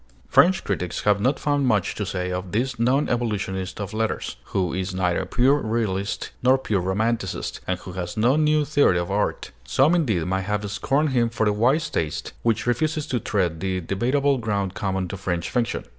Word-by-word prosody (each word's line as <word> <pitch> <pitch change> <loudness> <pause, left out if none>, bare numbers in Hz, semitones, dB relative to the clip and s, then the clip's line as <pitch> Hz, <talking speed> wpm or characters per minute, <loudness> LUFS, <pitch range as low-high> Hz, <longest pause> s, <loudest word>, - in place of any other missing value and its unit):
French 190 +2 +4
critics 90 -3 -2
have 105 -1 +3
not 135 +5 +2
found 145 -2 +1
much 105 -6 +1
to 105 - -4
say 90 -2 -2
of 90 0 -4
this 125 +2 -1
non 130 +5 +2
evolutionist 100 -5 -2
of 100 0 -5
letters, 110 0 -2
who 90 -3 -1
is 95 0 -3
neither 90 -2 0
pure 135 +4 +3
realist 110 -5 -2
nor 130 +1 +5
pure 105 -7 -1
romanticist, 100 +2 -1
and 95 - 0
who 90 - -8
has 90 +1 -5
no 120 +5 +3
new 155 -1 +3
theory 145 -11 +3
of 85 +1 -2
art. 105 +1 -1
Some, 135 - +3
indeed, 115 - +1
may 95 +1 0
have 105 +2 -2
scorned 140 +8 +1
him 120 -3 +2
for 110 -1 -1
the 105 - +2
wise 125 +9 +2
taste 80 -2 -3
which 115 -2 +1
refuses 150 +6 0
to 130 -5 -1
tread 90 -8 -1
the 95 +1 -1
debatable 130 - +1
ground 100 -5 -1
common 95 -2 -2
to 100 - -5
French 90 -3 -3
fiction. 120 -2 -1
105 Hz, 190 wpm, -24 LUFS, 95-130 Hz, -, nor